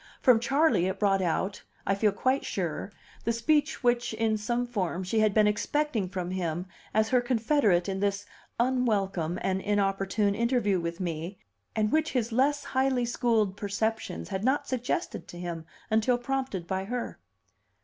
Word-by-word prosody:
From 250 -4 +5
Charley 250 - +3
it 190 +1 -2
brought 195 -2 +3
out, 185 +3 -1 0.2
I 195 - +2
feel 205 +1 +2
quite 260 +7 +1
sure, 180 +1 -3 0.3
the 230 - +1
speech 295 +6 +1
which 240 -2 +1
(in 220 0 +1
some 240 +3 -1
form) 190 -6 -2
she 205 +5 0
had 215 -1 +4
been 215 +1 +4
expecting 220 0 0
from 180 -2 -4
him 175 -2 -2 0.3
as 220 +1 +2
her 250 0 +4
confederate 230 - +2
in 190 -1 -2
this 200 0 0 0.3
unwelcome 200 -9 +1
and 190 0 0
inopportune 200 0 +1
interview 230 -4 +1
with 170 0 -4
me, 170 +1 -4 0.4
and 215 0 +1
which 315 0 +1
his 240 -3 0
less 280 +4 +2
highly 260 -2 +1
schooled 225 -4 +1
perceptions 205 - -2
had 190 +1 -3
not 265 +4 +1
suggested 250 -1 -2
to 175 - -10
him 170 -2 -5 0.2
until 225 +3 +3
prompted 250 -7 -3
by 190 +1 -2
her. 245 +3 -4
215 Hz, 160 wpm, -28 LUFS, 190-245 Hz, 0.4 s, From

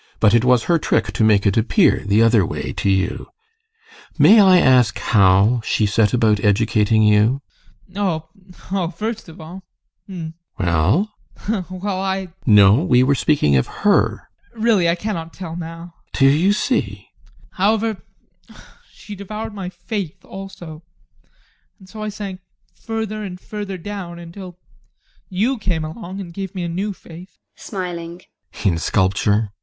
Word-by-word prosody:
But 105 -1 +4
it 120 -1 +4
was 125 -2 +3
her 170 +3 +2
trick - - 0
to - - 0
make 105 -2 +3
it 100 - +2
appear 150 - +3
the 105 +2 +3
other 115 -3 +4
way - - -4
to - - -1
you. 95 -1 -1 0.9
May 225 - +7
I 190 -3 +7
ask 125 -7 +4
how 100 +3 +3
she 110 - +1
set 105 0 +2
about 110 -4 +2
educating 110 +1 +2
you? 105 +6 +3 0.5
ADOLPH. 180 -5 -2 0.4
Oh, 190 -3 0
first 220 -2 -4
of 165 - -13
all 170 +4 -10 0.5
hm! 170 -5 -7 0.3
GUSTAV. 95 - -1
Well? 95 - +1 0.3
ADOLPH. 200 -5 -2
Well, 195 -2 -2
I 190 0 -2
GUSTAV. 175 - -18
No, 105 -2 +7
we 125 -8 +4
were 135 +2 +3
speaking 135 - +2
of 65 - +2
her. - - +1 0.3
ADOLPH. 220 - -6
Really, 205 -7 +3
I 170 - +2
cannot 170 -4 -5
tell 170 -3 -7
now. 165 0 -8 0.2
GUSTAV. - - -5
Do 135 - +5
you 165 +8 +3
see! - - +1
ADOLPH. - - -15
However 215 +2 0 0.9
she 210 - -11
devoured 210 +2 -7
my 195 -3 -5
faith 195 -3 -6
also, 190 -5 -10 1.0
and 190 - -18
so 215 +3 -10
I 215 - -3
sank 200 -3 -7 0.3
further 220 -1 -5
and 185 -3 -7
further 205 -1 -6
down, 180 -2 -7
until 175 +1 -10 0.7
you 225 +7 0
came 170 -6 -2
along 185 +4 -8
and 175 -3 -8
gave 195 +1 -6
me 180 - -3
a - - -2
new 190 +5 -3
faith. 175 -1 -13 0.2
GUSTAV. 175 -2 -7 0.3
[Smiling] - - -11
In 85 -4 +2
sculpture? 100 +4 +1
170 Hz, 160 wpm, -20 LUFS, -, 1.0 s, May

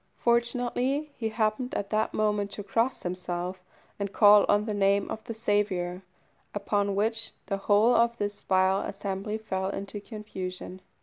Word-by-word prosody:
Fortunately 245 +4 +1
he 225 -2 -2
happened 220 +3 -1
at 200 - -3
that 215 0 +1
moment 210 -1 0
to 205 - -6
cross 230 +6 0
himself 180 0 -4 0.4
and 200 -1 -2
call 205 -1 +7
on 205 +1 +3
the 215 - -2
name 200 0 +2
of 220 - -5
the 230 - -4
Saviour, 195 -5 0 0.5
upon 200 -1 0
which 225 +2 0
the 195 - -2
whole 210 +4 +4
of 235 0 +3
this 205 -1 -3
vile 190 +1 +2
assembly 200 +2 -3
fell 190 -3 -3
into 200 +1 -5
confusion. 190 -4 -7
205 Hz, 150 wpm, -28 LUFS, 195-220 Hz, 0.5 s, call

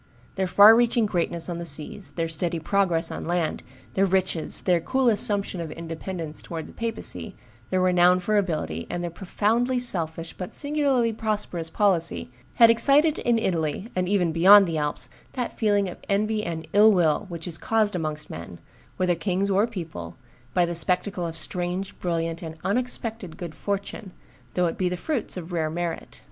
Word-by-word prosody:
Their 190 -1 -1
far 205 +4 +8
reaching 235 -1 +3
greatness 170 -4 0
on 170 -1 -4
the - - -4
seas, 160 +5 0
their 165 -1 -2
steady 165 +1 -2
progress 170 -1 0
on - - -6
land, 175 -2 -1 0.3
their 195 +1 +2
riches, 185 -3 -1
their 175 -3 +2
cool 260 +7 +1
assumption 205 -4 0
of 160 - -6
independence 165 -1 -6
towards 165 -2 -6
the - - -13
papacy, 230 -1 -3 0.3
their 185 0 +1
renown 180 0 +4
for 210 +4 -1
ability, 155 - -1
and 175 - -3
their 175 - -3
profoundly 225 +8 0
selfish, 165 -8 0
but 180 - -7
singularly 280 -6 +1
prosperous 210 -7 -3
policy, 170 -9 0 0.2
had 230 -1 +7
excited 285 +7 +4
in 240 -1 +2
Italy, 170 -1 -1
and 185 0 0
even 185 -5 +2
beyond 195 +5 +7
the 165 -3 -2
Alps, 150 0 -2 0.3
that 250 -2 -4
feeling 205 -3 +1
of 180 - -8
envy 210 +2 0
and 160 -3 -5
ill 210 +2 +7
will 180 +1 +2
which 170 -1 -6
is 165 -2 -4
caused 215 -3 +1
amongst 155 -3 -3
men, 85 +2 -8 0.4
whether 185 -1 +2
kings 190 +3 -1
or 200 +4 +3
people, 160 - -7 0.4
by 180 - +4
the 170 - -3
spectacle 180 +1 +2
of 165 0 -7
strange, 180 +3 -3
brilliant, 165 -1 -2
and 160 -2 -7
unexpected 225 -4 -2
good 170 -3 -7
fortune, 200 0 -5 0.4
though 180 - +2
it 165 - -3
be 185 -1 +1
the 180 - -3
fruits 245 - -3
of 175 0 -7
rare 160 -3 -1
merit. 170 +1 -5
180 Hz, 175 wpm, -25 LUFS, 165-210 Hz, 0.4 s, far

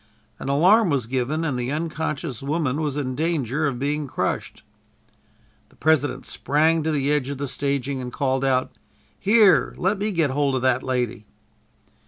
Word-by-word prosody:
An - - -5
alarm 185 +9 +4
was 135 -6 0
given 130 +6 -1
and 130 -5 -1
the 125 +2 -2
unconscious 155 -3 -3
woman 145 0 -1
was 150 -2 -2
in 130 -3 -2
danger 150 -1 -1
of 130 -3 -2
being 145 +2 -2
crushed. - - -3 1.1
The - - -24
President 155 -2 +1
sprang 160 +3 +1
to 160 +1 -1
the 145 -1 0
edge 145 -3 0
of 140 - -4
the 140 +1 -3
staging 140 0 -2
and 125 -1 -6
called 135 -1 -1
out: 130 -1 +1 0.5
"Here, 210 -1 +4
let 195 +3 0
me 210 +1 -1
get 165 -7 +1
hold 140 -1 +1
of 130 - -2
that 130 -1 +2
lady." 120 -5 -2
140 Hz, 170 wpm, -23 LUFS, 130-160 Hz, 1.1 s, alarm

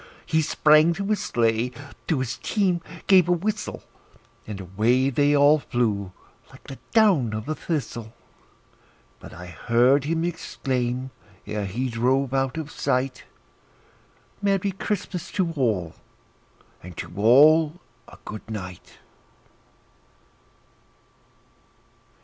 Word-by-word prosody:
He 160 0 +2
sprang 155 +2 +4
to 195 +4 -4
his 210 -1 0
sleigh, 115 +1 +1 0.4
to 150 -6 +1
his 130 -1 -4
team 185 -5 0 0.2
gave 185 -3 +5
a - - +5
whistle, 210 +5 -3 0.6
And 105 -2 -6
away 110 +9 +1
they 145 +3 +3
all 145 +2 +5
flew 105 -8 -1 0.4
like - - -16
the 135 - -10
down 180 - +3
of 110 0 -5
a 155 - -1
thistle; 130 -9 -4 1.1
But - - -12
I 90 - -10
heard 120 - +2
him 165 +2 -1
exclaim, 130 -6 -3 0.3
ere 105 -1 -3
he 120 +7 -2
drove 130 +3 0
out 135 +1 0
of 150 -2 -5
sight, 130 0 -1 1.2
"Merry 200 -1 +1
Christmas 190 -2 -4
to 180 -4 0
all, 110 - -1 0.9
and 90 -1 -11
to 85 - -6
all 150 - +5 0.3
a - - -14
good 110 +1 -8
night!" 95 -5 -8
135 Hz, 115 wpm, -24 LUFS, 115-165 Hz, 1.2 s, gave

